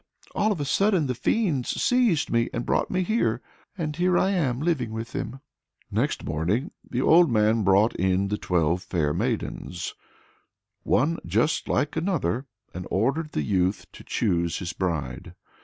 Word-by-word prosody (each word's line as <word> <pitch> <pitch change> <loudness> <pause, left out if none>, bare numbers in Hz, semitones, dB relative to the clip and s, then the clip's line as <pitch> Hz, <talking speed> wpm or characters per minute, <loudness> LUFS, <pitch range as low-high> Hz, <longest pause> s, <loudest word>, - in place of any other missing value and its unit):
All 215 +1 +1
of 195 - -2
a 145 - -1
sudden 190 +2 +2
the 130 - -1
fiends 140 - 0
seized 240 -11 +2
me 115 0 +2
and 120 - -3
brought - - +1
me 185 0 0
here; 220 +6 +1 0.4
and 155 -4 -3
here 180 +1 +2
I 190 - +2
am 140 -10 0
living 145 -8 0
with 115 +1 -5
them!" 135 -1 -5 0.5
Next - - 0
morning 90 - -1 0.2
the 125 +1 -1
old 170 +1 +6
man 110 0 +3
brought 100 +4 +4
in 95 +1 +1
the 105 - -1
twelve 85 0 +1
fair 85 -5 -1
maidens 115 +6 -3 0.9
one 165 +5 +1
just 110 - 0
like 145 - 0
another 155 - -1 0.3
and 90 +1 -6
ordered 140 +10 0
the 75 - 0
youth 95 +3 0
to - - -13
choose 85 -6 0
his 85 -2 -4
bride. 80 -9 -3
120 Hz, 160 wpm, -25 LUFS, -, 0.9 s, old